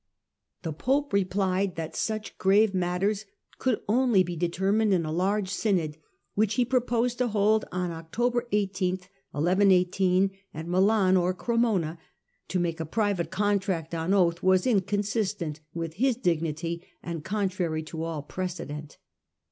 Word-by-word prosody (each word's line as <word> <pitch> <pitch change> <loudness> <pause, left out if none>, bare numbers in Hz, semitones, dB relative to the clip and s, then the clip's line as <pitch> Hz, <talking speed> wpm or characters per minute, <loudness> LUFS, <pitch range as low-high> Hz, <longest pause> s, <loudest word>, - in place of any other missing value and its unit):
The 160 -3 -3
pope 275 - 0
replied 190 -1 +1
that 165 -1 -5
such 215 -1 -3
grave 200 +2 +4
matters 190 +3 0 0.3
could 255 -4 0
only 230 -3 +4
be 175 -1 -5
determined 190 +5 +1
in 170 -3 0
a 155 - -3
large 190 +4 +1
synod, 185 -7 0 0.4
which 215 0 +1
he 250 - +3
proposed 245 -1 0
to 250 - +2
hold 215 0 +2
on 180 -1 -2
October 240 +10 -1
18 190 -3 0 0.4
at 185 +1 +2
Milan 190 +1 +4
or 180 +1 +1
Cremona. 205 -8 0 0.5
To 185 - -1
make 170 -1 -1
a 160 - -2
private 200 -3 0
contract 195 -5 0
on 165 +2 -1
oath 175 -4 +3
was 185 0 +3
inconsistent 200 - 0 0.2
with 165 -1 -3
his 250 +7 +2
dignity 170 -4 -1 0.2
and 170 -3 -5
contrary 185 -5 -1
to 160 +1 -6
all 165 -3 -3
precedent. 155 -4 -5
185 Hz, 135 wpm, -27 LUFS, 170-210 Hz, 0.5 s, grave